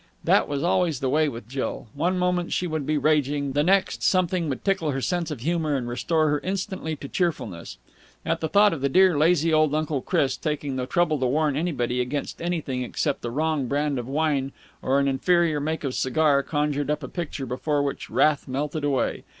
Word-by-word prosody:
That - - +3
was 145 0 -2
always 170 -5 +1
the 130 -1 -1
way 155 +1 +3
with 115 -4 -8
Jill. 130 0 -4
One 175 +6 0
moment 180 -1 0
she 180 - 0
would 155 -4 -3
be 155 0 +1
raging; 145 -2 +1
the 145 +2 +1
next, 190 +4 +2
something 180 -3 +1
would 130 - -4
tickle 190 -6 +1
her 135 -2 -1
sense 175 +3 -1
of 145 -7 -6
humour 160 0 0
and 125 -3 -2
restore 155 +6 +1
her 145 0 +1
instantly 190 -3 -3
to 140 - -8
cheerfulness. 125 - -3 0.5
And 165 0 0
the 160 - -2
thought 205 -1 +5
of 150 - -5
dear, 185 -2 +5
lazy 160 +1 +3
old 155 -1 +3
Uncle 155 -3 -1
Chris 140 -7 0
taking 145 0 -3
the 125 -1 -3
trouble 160 -1 +1
to 130 - +1
warn 150 +2 +1
anybody 125 -6 -1
against 135 +3 -4
anything 160 -7 -2
except 135 +3 -2
the 120 - -3
wrong 150 +1 -1
brand 145 0 0
of 120 - -6
wine 140 -1 0 0.3
or 135 +1 +1
an 140 - +1
inferior 160 +3 +2
make 155 +2 -3
of 135 -3 -2
cigar 140 +2 +2
conjured 145 0 -1
up 150 0 -1
a - - -4
picture 150 -3 -5
before 145 +3 -1
which 140 - -4
wrath 150 -2 +2
melted 145 +3 -3
away. 140 -3 0
150 Hz, 205 wpm, -25 LUFS, 135-165 Hz, 0.5 s, thought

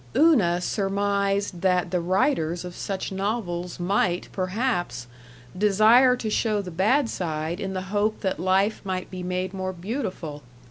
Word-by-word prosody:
Una 220 - +4
surmised 200 -1 0
that 180 -2 +2
the 180 - +1
writers 180 - 0
of 180 -1 -8
such 195 -1 -4
novels 190 -4 -3
might, 180 -1 0
perhaps, 185 - -2 0.5
desire 215 +6 +5
to 240 - -5
show 215 0 +1
the 185 -3 -5
bad 220 - +2
side 165 -3 -3
in 195 -2 -3
the 185 - -2
hope 210 +1 +1
that 190 -4 -1
life 190 +4 +2
might 185 -2 -4
be 185 -1 -6
made 180 +1 -2
more 185 -1 -3
beautiful. 185 - -5
190 Hz, 145 wpm, -25 LUFS, 180-210 Hz, 0.5 s, desire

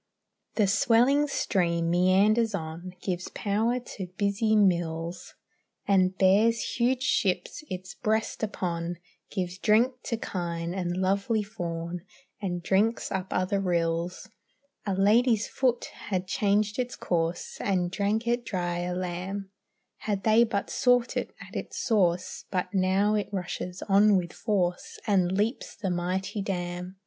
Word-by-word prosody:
The 215 - +4
swelling 240 +8 +4
stream 170 -10 0
meanders 200 +5 +3
on, 170 +2 -6
Gives 180 -1 -2
power 220 +4 +1
to 205 -6 -7
busy 205 +2 +2
mills, 170 -3 0 0.5
And 190 -1 +3
bears 215 +5 +3
huge 250 +2 +2
ships 185 +6 0
its 185 +1 -6
breast 220 +1 -1
upon, 175 -5 -2 0.3
Gives 185 -2 -3
drink 230 +5 +4
to 230 - -1
kine 170 -4 -3
and 180 -2 -2
lovely 200 +4 +1
fawn, 175 -4 -5 0.4
And 175 -3 -3
drinks 210 +5 +1
up 190 -1 -2
other 185 +2 0
rills. 170 0 -1 0.6
A 195 - +1
lady's 220 +3 +3
foot 250 -3 0
had 185 -2 -3
changed 210 +3 +1
its 250 -1 -2
course, 170 0 -2
And 180 -3 0
drank 210 +4 0
it 240 +1 +1
dry 175 -5 -2
a 180 0 -2
lamb, 185 +2 -4 0.5
Had 200 -3 -3
they 220 +2 +5
but 200 -3 -2
sought 245 -1 +2
it - - -1 0.2
at - - -15
its - - -5
source; 180 -6 +1
But 185 0 -2
now 195 +2 +2
it 210 -1 0
rushes 180 -1 -4
on 200 +1 +5
with 175 -2 -3
force 185 -5 -1
And 185 -4 +2
leaps 220 +6 -1
the 195 -4 -2
mighty 185 +4 -2
dam. 180 -1 -4
195 Hz, 135 wpm, -27 LUFS, 180-215 Hz, 0.6 s, they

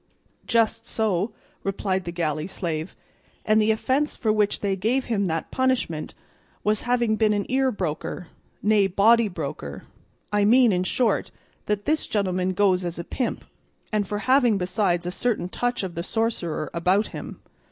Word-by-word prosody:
"Just 225 0 +1
so," 210 -1 0 0.3
replied 190 -1 -1
the 170 - -3
galley 155 -2 -2
slave, 170 -3 -4 0.5
"and 215 0 +4
the 215 - +2
offence 260 +7 +1
for 220 -3 +1
which 210 -1 +1
they 200 -2 0
gave 230 +8 0
him 205 -4 0
that 165 -2 -2
punishment 255 -12 0 0.5
was 210 0 +1
having 240 -3 +2
been 215 -1 +3
an 205 -1 -1
ear 265 0 +2
broker, 180 -2 -4 0.3
nay 210 -2 +4
body 220 +5 +4
broker; 140 - -6 0.5
I 205 0 +3
mean, 240 +2 +6
in 180 -1 +1
short, 225 +2 +1 0.4
that 210 -1 -1
this 310 +1 0
gentleman 185 -3 0
goes 185 -1 +3
as 175 -1 -4
a 170 - -4
pimp, 250 +7 -3 0.5
and 210 -2 +1
for 205 - -2
having 255 -5 +4
besides 180 -1 0
a 180 - -2
certain 210 -2 -1
touch 245 +2 -1
of 185 -2 -4
the 170 - -3
sorcerer 185 -7 -2
about 185 +5 +2
him." - - -8
205 Hz, 165 wpm, -24 LUFS, 180-225 Hz, 0.5 s, mean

